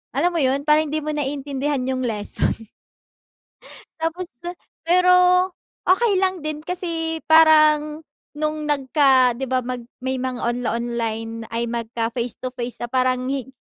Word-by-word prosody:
alam 340 +6 +2
mo 335 - 0
yun, 270 +1 +1
parang 305 +1 +4
hindi 310 +2 -1
mo 305 - -2
naiintindihan 280 -1 -2
yung 260 - -2
lesson. 225 0 -1 1.3
Tapos 330 +3 -3 0.6
pero 360 +2 +5 0.7
okey 410 +4 +4
lang 375 -4 0
din 305 -1 -3
kasi 330 -1 -3
parang 310 -1 +5 0.3
nung 305 0 -2
nagka 270 -3 +3
'di 265 +1 -4
ba 255 0 0
mag 250 0 -4 0.2
may 260 0 -1
mga 255 -1 -4
onla-online 230 -2 -3
ay 230 +1 -2
magka-face 235 0 -2
to 255 - -3
face 240 -1 -4
na 240 - -5
parang 255 0 +1
hin 270 -3 -3
270 Hz, 135 wpm, -22 LUFS, 245-310 Hz, 1.3 s, pero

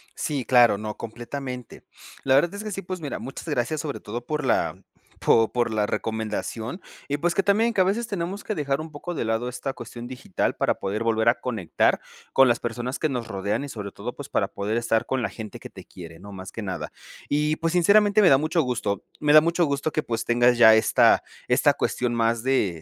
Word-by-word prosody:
Sí, 140 -5 -2
claro, 120 -3 +5
no, 105 0 -5
completamente. 125 +2 -7 0.4
La 135 0 +3
verdad 170 +6 +3
es 205 - -6
que 215 - -5
sí, 195 - -4
pues 185 -1 -6
mira, 145 - -4
muchas 135 - -8
gracias 150 +1 -1
sobre 145 -2 -5
todo 120 +3 -6
por 150 0 -2
la, - - 0 0.4
po 115 -1 +3
por 120 -2 0
la 105 -1 +1
recomendación 110 - -3 0.3
y, 145 - -1
pues, 170 +3 0
que 195 - +2
también 220 +4 +2
que 195 - +3
a - - +6
veces 215 +5 0
tenemos 195 -1 -4
que 215 - -3
dejar 140 -2 -1
un 160 0 -8
poco 170 +4 -6
de - - -2
lado 115 +2 -1
esta 130 +2 -4
cuestión 120 +1 -9
digital 125 -7 -2
para - - +1
poder 105 +3 -3
volver 115 0 +3
a 120 - +1
conectar 110 -9 0 0.3
con 135 0 +6
las 120 -1 +2
personas 120 +2 -4
que 155 - 0
nos 125 -4 -3
rodean 100 +4 -2
y 145 - -6
sobre 105 -5 -6
todo, - - -6
pues - - -9
para - - +1
poder 105 +3 -3
estar 115 -1 +1
con 130 -1 -1
la - - -1
gente 110 -3 -8
que - - -10
te - - -12
quiere 85 -2 -11
¿no? 100 +3 -11
Más 95 -1 -8
que 110 - -6
nada. 95 -2 -5 0.4
Y 150 +1 +1
pues 165 +1 -1
sinceramente 205 +4 +5
me 190 - +6
da 135 - +7
mucho 155 +3 +1
gusto, 115 -6 -2 0.2
me 150 -1 +3
da 155 - +10
mucho 170 +2 +2
gusto 140 +1 -1
que 155 - -1
pues 115 -1 -2
tengas 120 +1 +3
ya 110 -2 +8
esta 110 - +4 0.2
esta - - +4
cuestión 125 -1 -1
más 115 0 +1
de 105 -11 0
125 Hz, 225 wpm, -25 LUFS, 115-155 Hz, 0.4 s, da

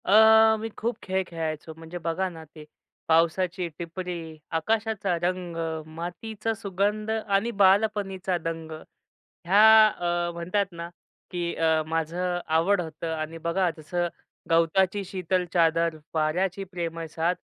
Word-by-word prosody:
अ, 220 +2 +7
मी 225 +1 -4
खूप 235 +2 -1
खेळ 190 0 0
खेळायचो. 160 -1 -4
म्हणजे 165 +2 -8
बघा 170 +3 -1
ना 165 -2 -10
ते, 155 - -10 0.4
पावसाची 170 +2 +2
टिपरी, 170 -2 -6 0.2
आकाशाचा 215 0 0
रंग, 180 -1 -2 0.4
मातीचा 215 +6 -4
सुगंध 210 +1 -1
आणि 215 0 0
बालपणीचा 195 -2 +2
दंग, 165 -1 -5 0.8
हया 195 +4 +5 0.3
अ, 175 -3 -1
म्हणतात 180 +4 -1
ना, 170 0 -6 0.4
की 175 -1 -2
अ, 160 -1 +2
माझ 160 0 -1
आवड 180 +1 +1
होत 160 -1 -7
आणि 160 0 -3
बघा, 170 +2 0
जसं 175 +3 -2 0.4
गवताची 185 +4 +2
शीतल 185 -1 -1
चादर, 165 -1 +3 0.2
वाऱ्याची 180 +5 0
प्रेमळ 170 -3 -5
साथ, 165 +3 0
175 Hz, 125 wpm, -26 LUFS, 165-195 Hz, 0.8 s, अ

